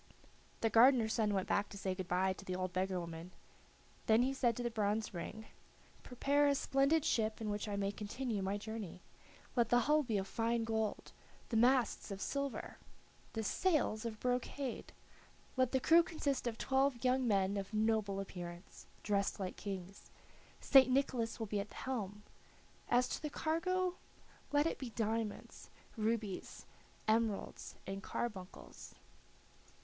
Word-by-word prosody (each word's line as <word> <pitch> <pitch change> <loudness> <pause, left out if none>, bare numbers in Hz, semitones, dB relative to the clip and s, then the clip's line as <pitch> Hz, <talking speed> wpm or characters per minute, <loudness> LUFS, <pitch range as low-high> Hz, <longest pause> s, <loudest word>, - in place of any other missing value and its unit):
The 225 - +2
gardener's 235 -1 +6
son 215 -3 +2
went 190 -2 0
back 205 0 +1
to 200 - -9
say 190 -1 -1
good 185 -1 -5
by 185 +2 +2
to 195 - -11
the 185 -1 -3
old 185 0 -3
beggar 185 0 0
woman; 170 +1 -7 0.8
then 220 +2 +5
he 265 +1 +1
said 240 -4 +1
to 245 - -2
the 240 - -1
bronze 215 0 0
ring: 190 +5 -6 0.6
"Prepare 285 +4 +2
a 285 - +3
splendid 275 +3 +2
ship 220 -1 +1
in 215 -2 -2
which 205 +1 -3
I 205 - -2
may 200 0 0
continue 210 +2 -3
my 195 +2 -1
journey. 210 -4 -6 0.5
Let 235 -3 +3
the 245 0 +5
hull 300 +5 +4
be 235 -7 -1
of 195 0 -2
fine 230 +1 0
gold, 220 -1 -2 0.4
the 230 - -2
masts 245 0 +3
of 195 -1 -5
silver, 280 +6 -3 0.5
the 225 - -2
sails 295 - +1
of 225 -2 -5
brocade; 250 +1 -2 0.6
let 255 -2 +2
the 265 - +2
crew 330 +6 +7
consist 285 -6 -2
of 225 -1 -2
twelve 265 -2 +1
young 255 0 +3
men 195 -2 +2
of 200 0 -4
noble 215 -2 +1
appearance, 175 -2 -8 0.2
dressed 200 0 0
like 185 -2 -3
kings. 195 -1 -7 0.5
St. 265 -2 +7
Nicholas 255 -3 +1
will 225 - -2
be 205 -1 -2
at 200 +1 -4
the - - -14
helm. 210 -6 -4 0.7
As 245 +1 +4
to - - -3
the 305 - -3
cargo, 365 +4 0 0.5
let 290 +1 +3
it 330 - -1
be 260 - -4
diamonds, 225 -1 -3 0.3
rubies, 220 -3 -2 0.4
emeralds, 220 -2 0
and 195 +1 -4
carbuncles." 195 -4 -6
220 Hz, 160 wpm, -36 LUFS, 200-255 Hz, 0.8 s, crew